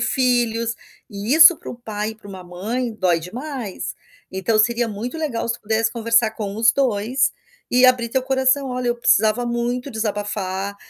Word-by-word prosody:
filhos 235 -3 +1 0.4
e 205 +7 -1
isso 325 +1 +8
para - - -8
um - - -8
pai 215 -2 -4
e - - -9
para 210 -2 -15
uma 190 -2 -9
mãe, 220 +8 -4
dói 180 -5 +1
demais. 240 - -6 0.4
Então, 190 +4 0
seria 235 +2 +1
muito 225 +7 -5
legal 250 -8 -3
se 235 - 0
tu - - -13
pudesse 220 +1 0
conversar 230 -1 +2
com 205 -3 -5
os 225 +1 +5
2, 255 0 +1 0.4
e 250 +1 +4
abrir 250 -2 +3
teu 260 +3 0
coração: 265 +1 +1
"Olha, 250 -1 -2
eu 240 - 0
precisava 220 0 +2
muito 240 +3 -2
desabafar, 205 -2 -3
230 Hz, 175 wpm, -21 LUFS, 210-250 Hz, 0.4 s, isso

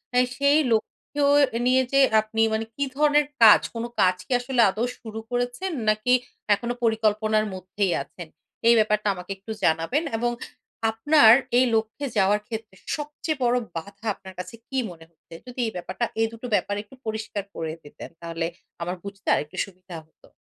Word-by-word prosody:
আ - - +4 0.2
সেই 280 +2 +4
লক্ষ্যেও 280 +6 -1 0.3
এ - - -2
নিয়ে 260 +1 +4
যে 275 - +5 0.2
আপনি 220 +1 -2
মানে 220 +1 -1
কি 280 - -1
ধরনের 295 0 +4 0.2
কাজ, 215 - +9
কোনো 230 +1 -3
কাজ 185 0 +4
কি - - -14
আসলে 245 0 +1
আদৌ 220 +5 -1
শুরু 220 -1 -7
করেছেন 245 +10 -2 0.2
নাকি 215 +4 +2 0.4
এখনো 235 +4 -3
পরিকল্পনার 215 -1 +2
মধ্যেই 185 0 -2
আছেন, 175 -3 -11 0.4
এই 235 - +8
ব্যাপারটা 210 -1 +1
আমাকে 180 +1 -8
একটু 200 +3 -9
জানাবেন। 165 - +2
এবং 240 +1 0 0.6
আপনার 225 +1 +6 0.3
এই 255 - +5
লক্ষ্যে 220 +6 -1
যাওয়ার 200 +1 +3
ক্ষেত্রে 220 -3 -7 0.2
সবচেয়ে 295 0 -4
বড় 240 0 +3 0.2
বাধা 200 +6 -8
আপনার 190 -1 -12
কাছে 180 +4 -7
কি 270 - -3
মনে 165 -2 -13
হচ্ছে, 165 0 -19
যদি 250 +1 -9
এই - - -3
ব্যাপারটা, 180 +6 -3
এই 225 - +3
২ - - -9
টো 250 - -5
ব্যাপার 205 0 0
একটু 215 +5 -17
পরিষ্কার 220 -2 -3
করে 160 -1 -3
দিতেন 145 - -11
তাহলে 165 0 -3 0.4
আমার 175 +2 -2
বুঝতে 200 -1 -10
আরেকটু 150 - -2
সুবিধা 185 -2 -11
হতো। 160 - -24
220 Hz, 175 wpm, -25 LUFS, 190-245 Hz, 0.6 s, কাজ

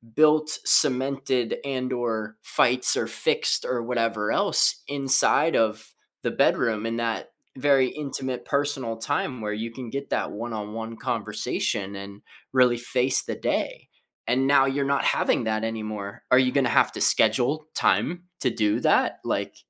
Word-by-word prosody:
built, 155 0 +3
cemented, 130 -2 +2
and/or 120 -5 -3
fights 125 +1 +2
or - - -1
fixed - - 0
or 120 -2 -2
whatever 115 -3 -1
else - - +3
inside 140 +3 +3
of 110 -1 -1 0.3
the - - -1
bedroom 110 -1 +1
in 115 0 -3
that 115 -1 -3 0.3
very 135 -1 +3
intimate 135 -3 -5
personal 140 -5 -2
time 130 0 -3
where 105 0 -3
you 115 +2 -5
can 125 0 -8
get 140 +3 -6
that - - -1
one-on-one 110 0 -6
conversation 105 -4 -3
and 100 +1 -10 0.3
really 125 -2 +4
face 125 +2 +2
the - - -5
day, - - -3 0.4
and 130 +2 +1
now 140 -1 +5
you're 135 +1 -1
not 140 0 0
having - - +1
that 110 0 -1
anymore. 110 -3 -5
Are 125 - +6
you 130 -1 +2
gonna 135 -3 +1
have - - +3
to - - -6
schedule 125 +8 +2
time 175 +1 +1 0.2
to 130 - +2
do 105 -3 0
that? - - +2
Like, - - -3
125 Hz, 150 wpm, -24 LUFS, 110-135 Hz, 0.4 s, Are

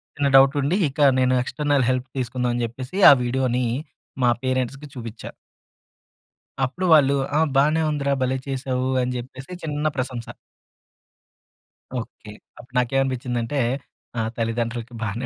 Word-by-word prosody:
చిన్న 145 -1 +1
డౌట్ 135 +1 +7
ఉండి 145 +6 +1
ఇక 135 - -15 0.2
నేను 130 0 +3
ఎక్స్టర్నల్ 145 0 0
హెల్ప్ 130 0 0
తీసుకుందాం 125 0 -1
అని 120 - -1
చెప్పేసి 125 - -7
ఆ - - +10
వీడియోని 125 0 0 0.6
మా 120 - +5
పేరెంట్స్‌కి 130 +2 -2
చూపిచ్చా. 115 -2 -7 1.3
అప్పుడు 180 +9 -4
వాళ్ళు 140 -3 +5 0.2
,"ఆ! - - +4 0.2
బాగానే 150 +4 +3
ఉందిరా 140 -2 0
భలే 130 +1 0
చేసావు" 130 -1 -2
అని 125 0 -2
చెప్పేసి 130 +4 -9
చిన్న 150 -1 -1
ప్రశంస. 125 -2 -3 1.7
ఓకే. 110 -2 -10 0.3
అప్పుడు 125 +1 -15
నాకేమనిపించిందంటే, 125 0 -1 0.6
ఆ - - +2 0.2
తల్లిదండ్రులకి 115 +1 -2
బానే 110 +4 -3
130 Hz, 125 wpm, -23 LUFS, 120-135 Hz, 1.7 s, ఆ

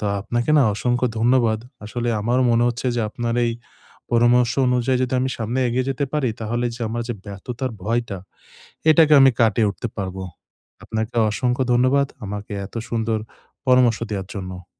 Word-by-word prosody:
তো - - -4 0.2
আপনাকে 120 +6 -1
না - - +6
অসংখ্য 125 +3 0
ধন্যবাদ। 115 -2 +2 0.2
আসলে 120 +3 -3
আমারও 120 +4 +1
মনে 120 0 +3
হচ্ছে 120 +2 -3
যে, - - +1
আপনার 115 +1 -2
এই 115 - 0 0.6
পরামর্শ 120 +1 +4 0.2
অনুযায়ী 125 +1 +1
যদি 130 0 -1
আমি 130 +1 0
সামনে 115 +3 -2
এগিয়ে 125 +2 0
যেতে 135 +1 -1
পারি, 150 -4 +1
তাহলে 120 +2 -2
যে 120 - -12
আমার 120 +2 -3
যে 120 - -2
ব্যর্থতার 120 +6 -5
ভয়টা, 115 -2 -1 0.7
এটাকে 155 0 +5
আমি 135 0 +7
কাটিয়ে 115 -1 +3
উঠতে 120 - -5
পারব। 95 -2 -4 0.7
আপনাকে 110 +1 -3 0.2
অসংখ্য 125 +4 0
ধন্যবাদ, 130 +3 +3 0.2
আমাকে 105 +1 -6
এত - - -18
সুন্দর 115 -1 -1 0.5
পরামর্শ 125 -3 +4
দেয়ার 95 -3 -4
জন্য। 95 -2 -7
120 Hz, 160 wpm, -22 LUFS, 110-125 Hz, 0.7 s, আমি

